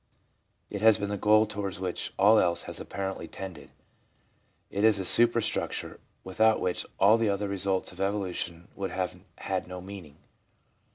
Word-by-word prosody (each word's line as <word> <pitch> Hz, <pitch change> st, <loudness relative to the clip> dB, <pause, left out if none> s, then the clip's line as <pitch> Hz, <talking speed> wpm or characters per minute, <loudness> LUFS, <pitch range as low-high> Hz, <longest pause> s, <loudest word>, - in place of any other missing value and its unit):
It 100 Hz, -, -4 dB
has 110 Hz, -2 st, +6 dB
been 100 Hz, 0 st, -3 dB
the 105 Hz, -, -1 dB
goal 110 Hz, +2 st, +4 dB
towards 100 Hz, -3 st, -5 dB
which 90 Hz, -2 st, -3 dB
all 105 Hz, +3 st, +6 dB
else 85 Hz, -1 st, +1 dB
has -, -, -7 dB
apparently 95 Hz, +1 st, -5 dB
tended. 90 Hz, -7 st, -9 dB, 1.0 s
It 100 Hz, -, -1 dB
is 110 Hz, -2 st, +5 dB
the 95 Hz, -, -3 dB
superstructure, 115 Hz, +2 st, +2 dB, 0.2 s
without 110 Hz, +4 st, +2 dB
which 90 Hz, -1 st, -2 dB
all 105 Hz, +4 st, +6 dB
the 115 Hz, -2 st, +2 dB
other 100 Hz, +1 st, -1 dB
results 100 Hz, -1 st, -1 dB
of 90 Hz, +1 st, -9 dB
evolution 95 Hz, -4 st, -3 dB
would 100 Hz, -1 st, -3 dB
have 95 Hz, -1 st, -3 dB, 0.2 s
had -, -, -3 dB
no 90 Hz, 0 st, -7 dB
meaning. 90 Hz, -6 st, -10 dB
100 Hz, 160 wpm, -28 LUFS, 95-105 Hz, 1.0 s, has